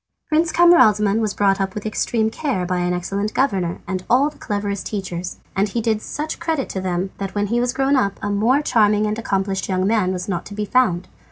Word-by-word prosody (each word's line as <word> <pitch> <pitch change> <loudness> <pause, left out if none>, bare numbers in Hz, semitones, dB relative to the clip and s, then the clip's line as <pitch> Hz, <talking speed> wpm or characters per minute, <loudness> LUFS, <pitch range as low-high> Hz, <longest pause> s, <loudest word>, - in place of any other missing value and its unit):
Prince 320 +1 +2
Camaralzaman 215 - +5
was 215 -2 -1
brought 195 -1 +2
up 190 -1 -2
with 210 - -5
extreme 220 +1 0
care 240 - -2
by 180 0 -1
an 180 0 0
excellent 195 +4 -2
governor 190 -10 0
and 185 -1 -3
all 275 +5 +4
the - - -21
cleverest 205 -1 -3
teachers, 185 -4 -5 0.2
and 200 +2 +1
he 235 - -2
did 220 -1 0
such 305 +6 -5
credit 325 -5 -2
to 190 - -3
them 185 +1 -2
that 195 0 -5
when 205 0 +1
he 235 +4 0
was 245 0 +1
grown 270 +2 +1
up, 200 -7 +1
a 205 - -1
more 235 +8 +2
charming 215 -5 +3
and 215 +1 -2
accomplished 195 -3 -1
young 185 0 +1
man 205 -3 +2
was 180 -1 -4
not 175 -4 -2
to 205 - -9
be 210 0 -2
found. 195 -7 +1
205 Hz, 225 wpm, -21 LUFS, 190-240 Hz, 0.2 s, Camaralzaman